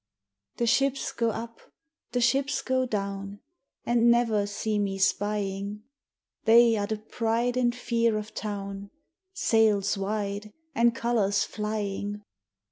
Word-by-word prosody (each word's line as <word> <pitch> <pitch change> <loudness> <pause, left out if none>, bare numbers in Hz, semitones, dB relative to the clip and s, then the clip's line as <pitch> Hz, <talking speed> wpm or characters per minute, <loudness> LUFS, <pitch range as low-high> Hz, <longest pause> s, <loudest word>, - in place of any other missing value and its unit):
The 235 - +1
ships 275 +3 +1
go 230 -1 0
up, 230 +1 -6 0.5
the 245 - 0
ships 270 +4 +1
go 260 0 +1
down, 200 -2 -4 0.5
And 235 0 +3
never 230 -4 +3
see 210 +1 -2
me 195 -1 -1
spying. 200 +1 -1 0.6
They 230 +1 +6
are 205 -1 -1
the 220 - -2
pride 230 +3 -1
and 245 -1 +1
fear 230 -3 +1
of 215 +1 -6
town 200 -2 -5 0.5
Sails 215 - +2
wide 205 +1 -3 0.2
and 235 0 +3
colors 215 -4 +1
flying. 210 -1 -4
215 Hz, 125 wpm, -27 LUFS, 205-235 Hz, 0.6 s, They